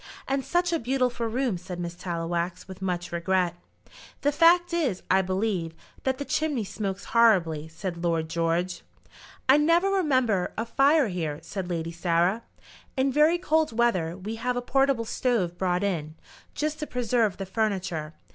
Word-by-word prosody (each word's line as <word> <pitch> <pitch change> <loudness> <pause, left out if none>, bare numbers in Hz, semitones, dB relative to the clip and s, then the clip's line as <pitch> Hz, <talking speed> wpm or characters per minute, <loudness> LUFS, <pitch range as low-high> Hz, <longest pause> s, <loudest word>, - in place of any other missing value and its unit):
"And 270 0 0
such 350 +2 +1
a 330 - +1
beautiful 250 -1 0
room!" 235 -4 -1
said 180 0 -7
Miss 170 -1 -4
Tallowax, 175 0 -3
with 190 0 -10
much 180 -2 -2
regret. 175 +1 0 0.7
"The 290 - +2
fact 345 +3 +4
is, 275 - 0
I 190 +1 +5
believe, 185 -3 -1 0.3
that 265 -1 +1
the 285 - -4
chimney 295 -7 0
smokes 200 -1 -4
horribly," 175 -10 +4
said 170 +2 -6
Lord 165 -2 0
George. 170 +2 -1 0.7
"I 265 +2 +7
never 335 +6 +3
remember 255 - +1
a 225 - -1
fire 275 +3 +4
here," 160 -5 -3
said 190 -3 -5
Lady 165 -1 -2
Sarah. 175 +5 +1 0.6
"In 265 +1 +2
very 305 +5 +4
cold 315 -8 +1
weather 185 -8 +1
we 210 +4 -5
have 250 +2 -1
a - - 0
portable 270 -2 +2
stove 220 -8 0
brought 180 0 0
in, 160 -6 -2 0.4
just 305 +1 -2
to 300 - -4
preserve 235 -5 0
the 195 - -4
furniture. 185 -7 -2
200 Hz, 160 wpm, -26 LUFS, 175-265 Hz, 0.7 s, I